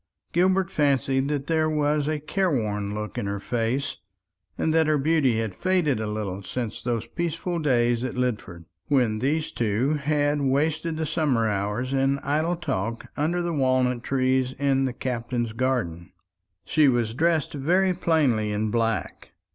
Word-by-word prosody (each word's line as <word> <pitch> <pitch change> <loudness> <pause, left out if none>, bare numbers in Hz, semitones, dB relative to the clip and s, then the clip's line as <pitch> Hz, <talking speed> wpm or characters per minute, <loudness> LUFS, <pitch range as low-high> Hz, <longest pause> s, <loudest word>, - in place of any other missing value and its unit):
Gilbert 185 +1 +2
fancied 135 -2 +1
that 145 -2 -2
there 160 -1 +1
was 150 -1 +1
a 155 -1 -1
careworn 120 - -1
look 105 0 -4
in 100 - -3
her 100 0 -2
face, 120 +6 -2 0.6
and 160 - +1
that 160 -1 +3
her 155 -1 +3
beauty 140 -5 +2
had 110 -4 -2
faded 170 - +1
a 110 - -2
little 105 -3 -3
since 115 +2 -4
those 120 -2 -2
peaceful 170 +1 -3
days 120 -5 +2
at 130 - -3
Lidford, 110 -9 -3 0.2
when 120 -7 +2
these 150 +5 0
two 115 +6 0
had 145 0 +1
wasted 155 +4 0
the 160 - -1
summer 145 -7 +1
hours 105 +5 -2
in 135 +1 +2
idle 155 +5 0
talk 115 - -3
under 170 +4 0
the 170 -1 -1
walnut 130 -3 +1
trees 130 0 +1
in 135 -1 +2
the 130 - -2
Captain's 120 -2 -3
garden. 115 -10 -2 0.5
She 155 -2 +4
was 120 -4 +1
dressed 160 +3 +1
very 180 +7 +2
plainly 140 -12 +1
in 105 +1 -1
black. 115 -1 -2
135 Hz, 155 wpm, -25 LUFS, 115-155 Hz, 0.6 s, She